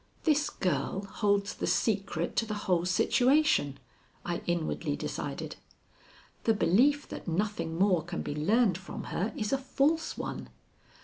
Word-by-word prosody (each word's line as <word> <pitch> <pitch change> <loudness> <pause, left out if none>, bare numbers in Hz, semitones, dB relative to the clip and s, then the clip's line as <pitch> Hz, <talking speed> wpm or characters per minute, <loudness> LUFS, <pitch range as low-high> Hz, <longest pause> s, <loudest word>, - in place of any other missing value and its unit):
"This 300 -2 +2
girl 180 +3 -1
holds 200 0 0
the - - -3
secret 195 -6 0
to 225 - +2
the 215 - -3
whole 175 -2 +2
situation," 245 - +3 0.5
I 175 0 -2
inwardly 165 -3 -1
decided. - - -5 0.9
"The 225 - +4
belief 270 +10 +3
that - - -8
nothing 170 -2 -1
more 185 -3 +3
can 175 +1 -4
be - - -3
learned 190 +5 +2
from 190 - -7
her 200 +6 -1
is 210 +3 -1
a 270 - +2
false 280 +5 0
one. - - -5
200 Hz, 140 wpm, -30 LUFS, 170-240 Hz, 0.9 s, The